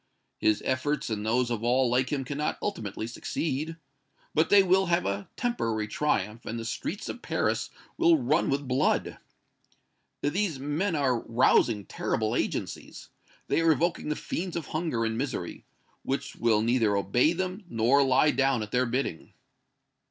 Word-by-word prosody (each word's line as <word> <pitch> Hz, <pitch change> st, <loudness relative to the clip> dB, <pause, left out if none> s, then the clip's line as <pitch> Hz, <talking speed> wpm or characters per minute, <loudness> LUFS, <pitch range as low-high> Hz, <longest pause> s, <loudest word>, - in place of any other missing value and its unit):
His 110 Hz, -1 st, +2 dB
efforts 130 Hz, 0 st, -1 dB
and 105 Hz, -1 st, -2 dB
those 120 Hz, +3 st, +1 dB
of 115 Hz, -1 st, -2 dB
all 125 Hz, +2 st, +3 dB
like 125 Hz, +2 st, +1 dB
him 135 Hz, -3 st, -1 dB
cannot 145 Hz, +3 st, -2 dB
ultimately 110 Hz, -, -4 dB
succeed. 150 Hz, +6 st, -3 dB, 0.6 s
But 160 Hz, +1 st, +2 dB
they 200 Hz, -1 st, +7 dB
will 190 Hz, +1 st, +3 dB
have 170 Hz, 0 st, +1 dB
a 100 Hz, 0 st, -3 dB
temporary 115 Hz, -, -1 dB
triumph, 105 Hz, -3 st, -1 dB
and 115 Hz, -, -5 dB
the 115 Hz, -, -5 dB
streets -, -, -4 dB
of -, -, -6 dB
Paris -, -, -1 dB, 0.3 s
will 165 Hz, -1 st, +5 dB
run 145 Hz, +5 st, +1 dB
with 140 Hz, 0 st, -1 dB
blood! 125 Hz, +1 st, +1 dB, 1.0 s
These 170 Hz, +1 st, 0 dB
men 155 Hz, +7 st, -1 dB
are 130 Hz, -5 st, +1 dB
rousing 115 Hz, -3 st, +2 dB
terrible -, -, -1 dB
agencies. -, -, -4 dB, 0.4 s
They -, -, +2 dB
are 165 Hz, -1 st, +5 dB
evoking 165 Hz, +1 st, -1 dB
the 150 Hz, -, 0 dB
fiends 180 Hz, +3 st, -4 dB
of 165 Hz, -4 st, -4 dB
hunger 155 Hz, -8 st, -1 dB
and 115 Hz, 0 st, -2 dB
misery, 135 Hz, 0 st, -4 dB, 0.4 s
which 135 Hz, -, -3 dB
will 110 Hz, -2 st, +2 dB
neither 115 Hz, -3 st, +2 dB
obey 120 Hz, -, +2 dB
them 185 Hz, +3 st, -3 dB
nor 120 Hz, +4 st, +3 dB
lie 135 Hz, +2 st, +4 dB
down 135 Hz, -4 st, +1 dB
at 105 Hz, -, -8 dB
their 125 Hz, 0 st, +2 dB
bidding." 120 Hz, -9 st, -3 dB
130 Hz, 160 wpm, -28 LUFS, 115-155 Hz, 1.0 s, they